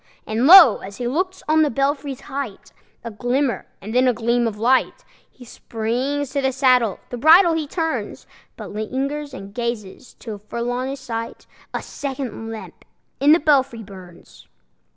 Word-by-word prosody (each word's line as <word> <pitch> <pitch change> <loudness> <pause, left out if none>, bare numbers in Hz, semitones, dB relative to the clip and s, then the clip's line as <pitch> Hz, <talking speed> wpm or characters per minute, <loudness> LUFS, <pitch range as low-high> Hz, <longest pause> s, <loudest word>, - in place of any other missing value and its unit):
And 225 +5 0
lo! 340 - +9
as 195 +1 -10
he 245 - -3
looks, 370 +8 -2
on 315 +1 +3
the 305 - +3
belfry's 275 +1 -2
height 265 -7 -7 0.3
A 230 - -6
glimmer, 245 +4 -1
and 215 +3 -8
then 255 +1 +3
a 250 - +3
gleam 235 +1 +1
of 215 -2 -5
light! 250 +4 +1 0.2
He 250 - -16
springs 250 +5 -3
to 280 - -1
the 265 0 +1
saddle, 250 -6 +2
the 245 - -5
bridle 330 +5 +6
he 320 -2 -2
turns, 325 +1 -3 0.3
But - - -9
lingers 275 +7 -3
and 200 -6 -10
gazes, 235 -2 -5
till 215 -4 -8
full 235 +4 -4
on 250 +1 -2
his 275 +1 -5
sight 230 -3 -6 0.3
A - - -4
second 265 -5 -6
lamp 225 -1 -9 0.4
in 285 +2 +4
the 325 - +6
belfry 270 -7 +1
burns! 185 -3 -14
255 Hz, 170 wpm, -21 LUFS, 225-280 Hz, 0.4 s, lo